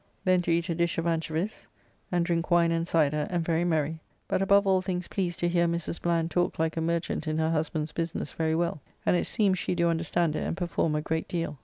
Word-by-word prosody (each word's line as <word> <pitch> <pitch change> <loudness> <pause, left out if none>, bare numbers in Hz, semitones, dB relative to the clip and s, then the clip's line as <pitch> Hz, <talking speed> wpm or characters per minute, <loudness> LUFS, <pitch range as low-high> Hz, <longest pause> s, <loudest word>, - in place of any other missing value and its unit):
Then 185 -1 +4
to 170 - -1
eat 170 +1 +1
a 170 - 0
dish 170 0 0
of 165 - -1
anchovies, 165 +4 -2 0.4
and 175 -1 +2
drink 170 0 -1
wine 170 -1 +4
and 165 0 0
syder, 150 -2 +2
and 175 -2 -1
very 165 0 +1
merry, 160 -2 0 0.3
but - - 0
above 200 +1 +4
all 190 -1 +3
things 180 -2 -3
pleased 175 -3 -2
to 175 - +2
hear 170 0 +2
Mrs. 170 0 -2
Bland 170 -1 0
talk 175 0 0
like 160 0 0
a 165 - -1
merchant 170 0 -1
in 155 0 0
her 160 0 +1
husband's 155 -1 -1
business 165 -1 -3
very 160 -1 0
well, 170 -3 -1 0.2
and - - +4
it - - 0
seems 195 -4 +2
she - - -1
do 170 0 +2
understand 165 -1 0
it - - -1
and - - -3
perform 170 -3 0
a 150 - 0
great 160 0 -2
deal. 165 -5 -3
170 Hz, 235 wpm, -28 LUFS, 160-175 Hz, 0.4 s, Then